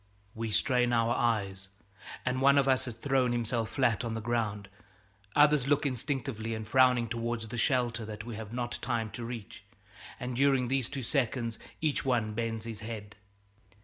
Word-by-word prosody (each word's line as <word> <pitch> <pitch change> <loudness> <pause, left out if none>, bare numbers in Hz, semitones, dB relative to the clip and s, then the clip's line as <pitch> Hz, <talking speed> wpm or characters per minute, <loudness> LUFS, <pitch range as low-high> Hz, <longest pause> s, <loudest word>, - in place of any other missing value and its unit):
We 115 0 -3
strain 125 +3 +2
our 115 0 +3
eyes, 100 -5 0 0.6
and 130 0 0
one 140 +1 +6
of 140 -1 +4
us 130 -1 +3
has 120 -3 -6
thrown 130 -1 +2
himself 115 -1 -1
flat 125 -4 +1
on 115 -1 -2
the - - -2
ground; 110 -3 -1 0.7
others 150 -2 +5
look 145 +1 +2
instinctively 130 -4 -2
and 110 0 -6
frowning 125 -1 +4
towards 115 0 -3
the 120 - -6
shelter 120 -2 +1
that 105 0 -6
we 120 -2 -6
have 110 -1 -7
not 120 0 -3
time 115 -2 -1
to 120 - -6
reach, 115 -3 -7 0.6
and 125 0 -4
during 135 -2 +3
these 135 -2 +1
two 140 -2 -4
seconds 120 -3 -1 0.2
each 155 -3 +1
one 120 -5 +1
bends 115 0 -2
his 115 -2 -6
head. 105 -2 -7
120 Hz, 175 wpm, -30 LUFS, 110-130 Hz, 0.7 s, one